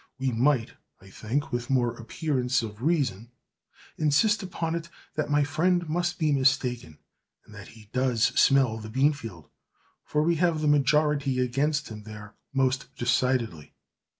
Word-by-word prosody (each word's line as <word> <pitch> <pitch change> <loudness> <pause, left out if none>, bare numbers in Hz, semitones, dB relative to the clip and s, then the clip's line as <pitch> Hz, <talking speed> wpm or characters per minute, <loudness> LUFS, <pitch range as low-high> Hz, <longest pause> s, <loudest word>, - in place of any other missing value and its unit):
We 130 0 -1
might, 125 +1 +1 0.3
I 95 0 -16
think, 135 +9 -3
with 120 0 -3
more 125 -3 +1
appearance 125 0 -1
of 105 0 -8
reason, 130 - 0 0.7
insist 185 +9 +3
upon 170 -3 -3
it 170 0 -4 0.2
that 155 - -2
my 145 0 +3
friend 175 +4 +1
must 175 +2 -1
be 155 -2 +1
mistaken, 125 - 0 0.5
and 105 - -16
that 100 -1 -10
he 105 -1 -17
does 125 -3 +1
smell 130 -4 +3
the 110 0 -8
beanfield, 120 - -1 0.6
for 150 0 0
we 170 +1 +2
have 165 -2 +1
the 155 - 0
majority 145 -1 +2
against 140 +4 0
him 105 -1 -8
there 105 -1 -11 0.2
most 130 -1 0
decidedly. 120 - -1
135 Hz, 150 wpm, -27 LUFS, 115-150 Hz, 0.7 s, insist